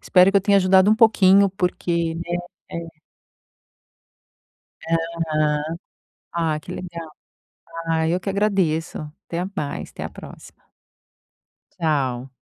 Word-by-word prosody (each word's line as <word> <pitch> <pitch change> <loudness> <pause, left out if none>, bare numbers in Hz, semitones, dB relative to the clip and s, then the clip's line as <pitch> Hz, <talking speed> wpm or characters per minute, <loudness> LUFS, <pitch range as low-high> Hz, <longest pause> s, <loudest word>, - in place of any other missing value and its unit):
espero 185 +1 +5
que 200 - +2
eu - - +5
tenha 200 +1 +3
ajudado 190 0 +5
um 215 - +6
pouquinho, 200 -3 +5
porque, 170 -3 -1
né, 175 +1 -3 0.3
é. 165 -1 -7 1.9
Aham. 160 -2 0 0.6
Ah, 165 -3 0
que - - -9
legal. 170 -2 -7 0.8
Ah, 160 -1 +1
eu 175 +2 +1
que 195 - -4
agradeço. 190 -5 0 0.3
Até 170 +1 -2
mais, 145 -7 -4
até - - -7
a - - -4
próxima. - - -13 1.1
Tchau. 135 -5 -1
170 Hz, 115 wpm, -22 LUFS, 160-190 Hz, 1.9 s, um